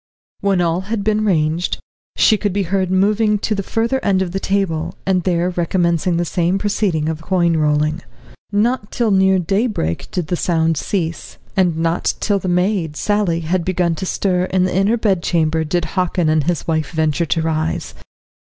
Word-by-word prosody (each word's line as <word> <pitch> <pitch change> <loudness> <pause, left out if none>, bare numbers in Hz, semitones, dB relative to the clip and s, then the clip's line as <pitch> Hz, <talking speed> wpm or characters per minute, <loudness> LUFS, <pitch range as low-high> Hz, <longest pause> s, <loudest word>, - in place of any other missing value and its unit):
When 195 -2 +1
all 170 +1 +1
had 220 -3 -1
been 215 0 +1
ranged, 165 -2 +1 0.4
she 220 - +5
could 205 -2 -2
be 200 0 0
heard 190 +1 0
moving 210 +3 +2
to 215 - -1
the 200 - -1
further 230 +6 -1
end 190 -1 +2
of 180 - -5
the 195 - -2
table, 195 -6 -1
and 185 -1 +2
there 175 0 0
recommencing 170 0 0
the 175 - 0
same 175 +3 0
proceeding 195 -6 0
of 160 0 -3
coin 170 -1 +1
rolling. 155 +1 +1 0.5
Not 210 +1 0
till 235 -3 0
near 190 0 +4
daybreak 190 - -1
did 180 -3 -2
this 175 - -1
sound 165 -2 +1
cease, 165 0 -3 0.2
and 180 -4 +2
not 165 +1 0
till 205 -2 +1
the 185 - -5
maid, 180 -3 0
Sally, 205 -5 0
had 170 +2 -1
begun 175 -1 0
to 185 +4 -4
stir 180 -2 0
in 185 0 +1
the 185 - -1
inner 200 +5 +2
bedchamber 170 -6 +1
did 165 +2 -1
Hockin 180 -1 0
and 155 -2 +2
his 175 -1 -1
wife 160 -2 0
venture 160 0 0
to 165 - 0
rise. 160 0 -2
180 Hz, 180 wpm, -18 LUFS, 165-195 Hz, 0.5 s, she